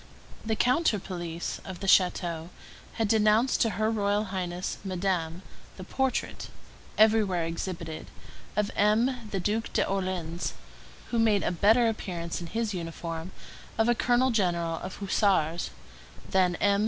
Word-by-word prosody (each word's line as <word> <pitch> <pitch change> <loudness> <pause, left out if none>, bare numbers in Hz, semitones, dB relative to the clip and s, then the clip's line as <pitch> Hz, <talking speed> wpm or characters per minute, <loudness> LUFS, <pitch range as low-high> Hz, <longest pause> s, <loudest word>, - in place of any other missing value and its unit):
The 220 0 0
counter 250 +1 +3
police 175 -3 -5
of 185 -2 -8
the - - -5
château 175 -3 +2 0.4
had 225 -2 0
denounced 220 +3 +3
to 230 - +4
her 220 0 +2
Royal 205 -1 +1
Highness 180 -1 -3
Madame, 185 -2 -2 0.3
the 185 - -7
portrait, 265 +6 -2 0.5
everywhere 215 -6 +4
exhibited, 165 -1 -5 0.5
of 210 0 0
M. 225 +3 +2
the 195 - -2
Duc 215 +5 0
d'Orléans, 185 -3 -1 0.6
who 235 - +1
made 215 -3 +3
a - - +1
better 220 +7 +4
appearance 175 -7 -3
in 170 - -6
his 225 +3 -2
uniform 165 0 -5 0.5
of 225 +1 +3
a 240 - +5
colonel 245 +2 +2
general 170 -6 0
of 190 - -6
hussars 190 -5 +1 0.6
than 185 -2 +3
M. 200 +1 +2
195 Hz, 135 wpm, -28 LUFS, 175-220 Hz, 0.6 s, a